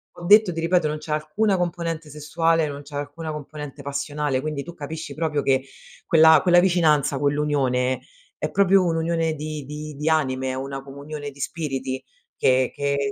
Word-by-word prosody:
ho 175 - -9
detto, 210 0 +6
ti 165 - -4
ripeto, 170 -1 +2
non 150 - -2
c'è 155 0 -4
alcuna 155 +8 +1
componente 165 -3 -3
sessuale, 160 +2 +1
non 145 0 -6
c'è 145 0 -11
alcuna 145 +2 -5
componente 150 -1 -8
passionale, 145 -1 -2
quindi 150 -1 -3
tu 170 +2 -9
capisci 160 +1 -6
proprio 155 -2 -1
che 135 -1 +2 0.4
quella 160 -1 +7
quella 175 -1 +5
vicinanza, 155 -6 +3
quell'unione 140 -3 +1 0.4
è - - -2
proprio 195 -1 +4
un'unione 165 -1 0
di 155 0 -5
di 150 +1 -7
di 150 +3 -1
anime, 130 -4 0
una 135 +1 -5
comunione 145 +2 -7
di 140 0 -15
spiriti 135 -4 -3 0.3
che 130 -1 +2
che 140 0 -1
150 Hz, 165 wpm, -23 LUFS, 140-165 Hz, 0.4 s, quella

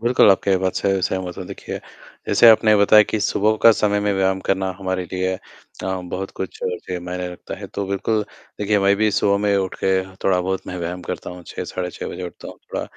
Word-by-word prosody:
बिल्कुल, 120 -3 +5
आपकी 95 0 +3
बात 95 0 -1
से 95 -1 +1
सहमत 90 -1 -2
हूँ। 95 - -5
देखिए, - - -6 0.5
जैसे 120 - +6
आपने 110 -1 +6
बताया 105 +1 +7
कि 110 - 0
सुबह 105 +1 +2
का 115 - +9
समय 105 -1 +1
में 105 0 +1
व्यायाम 95 0 +1
करना 95 -1 +1
हमारे 95 -1 -2
लिए 95 0 0
अ, - - -9 0.4
बहुत 95 0 -4
कुछ 95 - -5
जी, 90 0 -3
मायने 90 +1 -4
रखता 90 - -8
है, - - -7
तो 100 - -4
बिल्कुल, 100 +3 0 0.4
देखिए, 105 0 +2
मैं 100 0 +4
भी 110 +1 +2
सुबह 100 0 +2
में 100 -1 +2
उठके 95 -1 -2 0.2
हाँ, 95 0 -14
थोड़ा-बहुत 95 0 0
मैं 90 - -5
व्यायाम 90 +1 -4
करता - - -4
हूँ, 90 0 -10
6 - - -5
साढ़े 90 -1 -4
6 - - -7
बजे - - -7
उठता - - -10
हूँ, - - -10
थोड़ा - - -4
95 Hz, 220 wpm, -21 LUFS, 90-100 Hz, 0.5 s, का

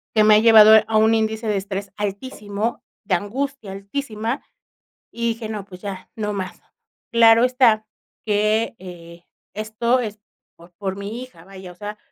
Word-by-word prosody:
que 215 - +5
me 215 0 +6
ha - - +6
llevado 220 -1 +8 0.2
a 220 -1 +1
un 220 +1 +4
índice 220 0 -1
de 210 - +1
estrés 195 0 -5
altísimo, 205 +1 -4 0.2
de 195 -2 +2
angustia 235 +3 -4
altísima, 220 +4 -4 0.7
y 235 0 -2
dije: 225 -1 -4
"No, 210 -3 -5
pues, 180 -2 -13
ya, 195 -2 -7
no 210 -2 -3
más". 185 -3 -6 0.5
Claro 230 0 +6
está 245 -4 +3 0.4
que, 215 +2 +1
eh, 170 -2 -12 0.3
esto 220 +4 0
es 215 -3 -5 0.4
por 170 +1 -17
por 195 -2 -3
mi 210 +5 -6
hija, 255 -11 -12
vaya, 190 -2 -11
o - - -16
sea, 210 +2 -7
215 Hz, 165 wpm, -21 LUFS, 195-225 Hz, 0.7 s, llevado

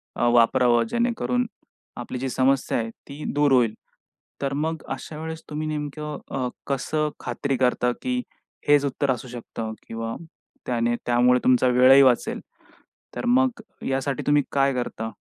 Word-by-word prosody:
अ, - - -1
वापरावं 120 0 +4
जेणेकरून 240 +1 0 0.5
आपली 120 +1 -5
जी 135 +1 -2
समस्या 130 +1 +1
आहे 115 -1 -2 0.2
ती 145 +2 -8
दूर 145 0 +3
होईल. 120 -4 +4 0.7
तर 140 -1 -1
मग 160 +2 -2
अशा 135 +3 -6
वेळेस 160 0 -5
तुम्ही 155 +1 -3
नेमकं 150 0 -4 0.2
अ, 130 -2 0 0.2
कसं 150 +3 -1
खात्री 140 -2 -2
करता, 125 -1 +2
की 250 -1 -1 0.5
हेच 145 -1 +5
उत्तर 140 0 0
असू 125 0 -4
शकतं 115 -2 -6
किंवा 115 0 -4 0.5
त्याने 120 -1 0
त्यामुळे 125 +1 +4
तुमचा 130 0 +4
वेळही 130 +2 +7
वाचेल. 125 -3 +2 0.8
तर - - -4
मग 250 -1 +2 0.2
ह्यासाठी 135 0 -1
तुम्ही 145 0 +4
काय 140 0 +2
करता? 115 -3 -3
135 Hz, 145 wpm, -24 LUFS, 125-150 Hz, 0.8 s, वेळही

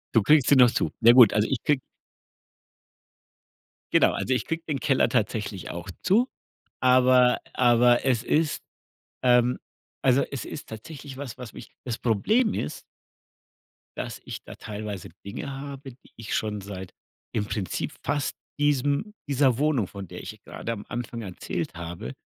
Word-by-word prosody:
Du 110 - +5
kriegst 150 -1 +5
sie 145 - +6
noch 125 -2 +7
zu. - - 0
Naja, 115 +1 +8
gut, 120 -5 +8
also 105 +1 +3
ich 135 - 0
kriege 145 -3 +2 2.1
Genau, - - +5
also, 130 - -1
ich 125 - -1
kriege 165 0 -3
den 145 -3 -1
Keller 135 -5 +2
tatsächlich 105 -5 -1
auch 85 +2 -6
zu, 225 +7 +3 0.5
aber 125 -1 +5 0.2
aber 120 0 +4
es 125 -3 +2
ist, 155 +2 +1 0.6
ähm 125 0 +4 0.4
also, 130 +1 +4
es 140 - -4
ist 145 - -8
tatsächlich 135 +5 -9
was, 135 -4 -7
was 125 -4 -9
mich - - -11
das 120 -3 -3
Problem 210 - +2
ist 75 - -4 1.2
dass - - -5
ich - - -7
da - - -10
teilweise 105 -3 -6 0.2
Dinge 100 +7 -5
habe, 135 0 -7
die 125 - -24
ich 115 -2 -4
schon 105 -2 -2
seit 95 -2 -8 0.4
im 105 -1 0
Prinzip 95 -5 -3
fast 145 -1 -1 0.2
diesem 145 - +1
dieser 135 -3 +3
Wohnung, 140 -8 +1
von 100 -2 -8
der - - -8
ich - - -9
gerade 115 - -5
am 105 -2 -8
Anfang 120 -1 -4
erzählt 95 -4 -5
habe, 85 -5 -6
125 Hz, 155 wpm, -26 LUFS, 105-140 Hz, 2.1 s, Naja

